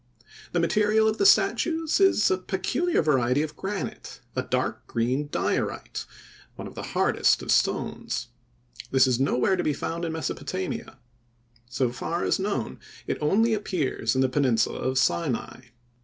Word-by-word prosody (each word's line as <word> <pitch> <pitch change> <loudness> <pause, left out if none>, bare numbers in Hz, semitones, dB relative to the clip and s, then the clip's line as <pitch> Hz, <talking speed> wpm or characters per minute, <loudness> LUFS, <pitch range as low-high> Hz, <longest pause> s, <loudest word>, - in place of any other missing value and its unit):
The 175 - +1
material 210 +5 +3
of 220 - 0
the 400 - +5
statues 325 -5 +3
is 385 - +4
a 185 - +2
peculiar 195 - 0
variety 135 -1 +2
of 155 -1 -6
granite, 195 +3 -5 0.2
a - - +1
dark - - -2
green 125 +5 -1
diorite, - - -2 0.5
one - - -7
of - - -11
the - - -6 0.2
hardest - - +3
of - - -2
stones. 125 -1 0 0.6
This 130 0 +5
was 130 -2 +1
nowhere 135 +6 +2
to 175 - -1
be 150 - +1
found 165 +4 -4
in 165 -1 -2
Mesopotamia. 140 -11 -4 0.7
So 130 -2 0
far 170 +7 -3
as - - +1
known, 190 - -2 0.3
it - - -3
only 220 +10 +3
appears 165 - -1
in 130 - +2
the 130 - +4
peninsula 130 -4 +1
of 130 0 -1
Sinai. 130 -3 -1
155 Hz, 155 wpm, -26 LUFS, 130-200 Hz, 0.7 s, the